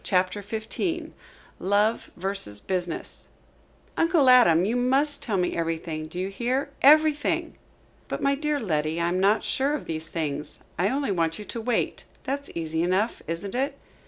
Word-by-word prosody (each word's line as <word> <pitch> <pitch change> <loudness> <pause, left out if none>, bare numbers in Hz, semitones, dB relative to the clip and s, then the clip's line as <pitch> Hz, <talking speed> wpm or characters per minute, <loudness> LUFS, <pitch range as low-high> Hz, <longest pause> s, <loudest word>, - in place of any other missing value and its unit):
CHAPTER 185 +1 +1
XV 230 - -3 0.5
LOVE 205 +4 +1
VERSUS 180 - -3
BUSINESS 180 - -3 0.7
"Uncle 330 -6 +4
Adam, 180 -9 +6
you 225 +4 0
must 270 +4 +2
tell 210 -5 -1
me 180 -1 0
everything. 165 -1 -3
Do 175 - -10
you 185 +1 -2
hear? 255 +7 -1
everything!" 300 +1 +4 0.5
"But - - -3
my 275 - +2
dear 300 +1 -1
Letty, 155 - -1
I 170 0 +1
am 180 +1 0
not 200 +3 +3
sure 280 +3 +1
of 300 - -6
these 160 -1 -4
things. 150 -3 -4 0.2
I 185 +3 +3
only 275 -2 -1
want 165 -3 0
you 210 - -8
to 230 - -5
wait. 245 +1 -1 0.2
That's 280 +1 -3
easy 160 -1 -2
enough, 185 +6 0
isn't 170 +5 -4
it?" 275 +3 -1
200 Hz, 160 wpm, -26 LUFS, 170-270 Hz, 0.7 s, Adam